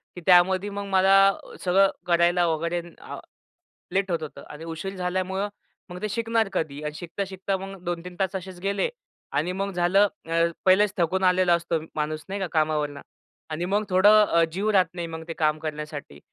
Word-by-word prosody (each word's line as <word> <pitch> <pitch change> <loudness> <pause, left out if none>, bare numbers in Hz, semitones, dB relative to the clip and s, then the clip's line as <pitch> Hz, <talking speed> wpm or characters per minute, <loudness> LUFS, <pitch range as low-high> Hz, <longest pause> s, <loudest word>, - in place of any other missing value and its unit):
की 180 - -8
त्यामध्ये 185 +2 +5
मग 200 0 -5
मला 195 0 +4 0.5
सगळं 195 +2 +4 0.2
करायला 175 0 +3
वगैरे 170 +2 -1 0.2
आ - - -8 0.8
लेट 195 -1 0
होत 165 -2 0
होतं 155 - -8
आणि 150 +2 -9
उशीर 165 +4 -5
झाल्यामुळे 185 +2 -2 0.4
मग 180 +1 -8
ते 215 - -2
शिकणार 225 0 0
कधी 150 -5 -2
आणि 150 0 -3
शिकता, 175 +4 -4
शिकता 190 +1 -3
मग 195 -1 -9
2-3 175 +1 -4
तास 195 0 0
असेच 185 -1 -6
गेले 200 - 0 0.4
आणि 160 +5 0
मग 195 +2 -2
झालं 185 +3 +3 0.2
अ, 165 0 +2 0.2
पहिलेच 195 +2 +5
थकून 185 +2 +1
आलेला 180 -1 +4
असतो 170 -1 0 0.2
माणूस 155 0 -2
नाही 200 +1 -3
का 190 - -1
कामावरुन 155 -2 0 0.5
आणि 160 +2 -3
मग 205 +3 +1
थोडं 205 +3 +6
अ, 170 -4 +3
जीव 195 +5 -1
राहत 190 -4 +4
नाही 170 -1 -4
मग, 160 0 -7
ते 165 - -4
काम 155 -1 +1
करण्यासाठी 150 - -6
180 Hz, 180 wpm, -25 LUFS, 165-195 Hz, 0.8 s, थोडं